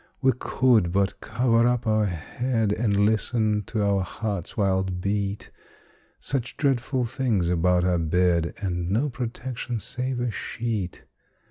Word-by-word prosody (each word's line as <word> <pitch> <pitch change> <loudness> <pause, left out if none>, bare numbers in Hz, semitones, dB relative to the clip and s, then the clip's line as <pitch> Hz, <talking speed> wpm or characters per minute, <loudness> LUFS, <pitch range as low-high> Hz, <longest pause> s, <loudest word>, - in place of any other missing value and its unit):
We 130 -1 +4
could 115 -9 +3
but 100 +1 0
cover 120 -1 +2
up 125 0 0
our 110 -1 +2
head, 110 +6 -1
And 100 -3 +2
listen 110 -1 +1
to 110 -3 -1
our 100 -1 +2
heart's 100 -1 -4
wild 95 -3 +1
beat 100 +1 -2 0.7
Such 130 -3 -3
dreadful 130 -2 +1
things 115 -8 0
about 90 +1 +2
our 90 -1 +2
bed, 85 +1 +1
And 90 -2 -1
no 125 +9 +1
protection 120 -1 -4
save 125 +2 -3
a 120 -1 -1
sheet! 110 -3 -4
105 Hz, 135 wpm, -25 LUFS, 95-120 Hz, 0.7 s, We